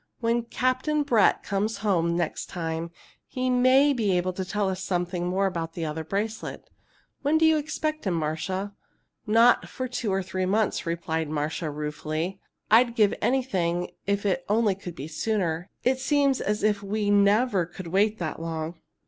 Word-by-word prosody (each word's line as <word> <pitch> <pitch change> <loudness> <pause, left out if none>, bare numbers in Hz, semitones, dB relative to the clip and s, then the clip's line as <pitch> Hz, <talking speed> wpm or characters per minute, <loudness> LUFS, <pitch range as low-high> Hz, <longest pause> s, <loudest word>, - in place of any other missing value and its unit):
When 235 0 0
Captain 255 +5 0
Brett 235 -8 +3
comes 205 +2 -1
home 170 -4 +2
next 170 -3 -2
time, 165 -1 -4 0.4
he 255 0 -1
may 260 +3 +5
be 210 -7 +1
able 180 +1 -1
to 190 - -3
tell 205 +2 -1
us 190 0 -3
something 175 -1 -1
more 190 +2 +1
about 165 -3 -2
the 165 -1 -3
other 155 +1 -3
bracelet. 210 +6 -4 0.5
When 290 +3 +3
do 320 - +4
you 320 0 +5
expect 310 -2 -2
him, 180 - +1
Marcia?" 165 +6 -2 0.5
"Not 230 +3 +5
for 255 - -4
two 240 -4 -2
or 190 0 0
three 185 0 -2
months," 205 -2 0
replied 160 -2 -2
Marcia, 155 +2 -2
ruefully. 155 +5 -3 0.3
"I'd 235 +1 +5
give 210 -3 +4
anything 180 -10 0 0.2
if 200 0 0
it 180 -3 +1
could - - -2
only 220 -3 +3
be 175 -6 -8
sooner. 175 0 -1
It 260 +1 +2
seems 275 0 +2
as 210 +1 -1
if 210 -1 +2
we 205 +1 -1
never 205 -2 +3
could 185 +1 -9
wait 205 +4 +2
that 165 -3 -4
long!" 165 0 -4
195 Hz, 170 wpm, -26 LUFS, 170-230 Hz, 0.5 s, may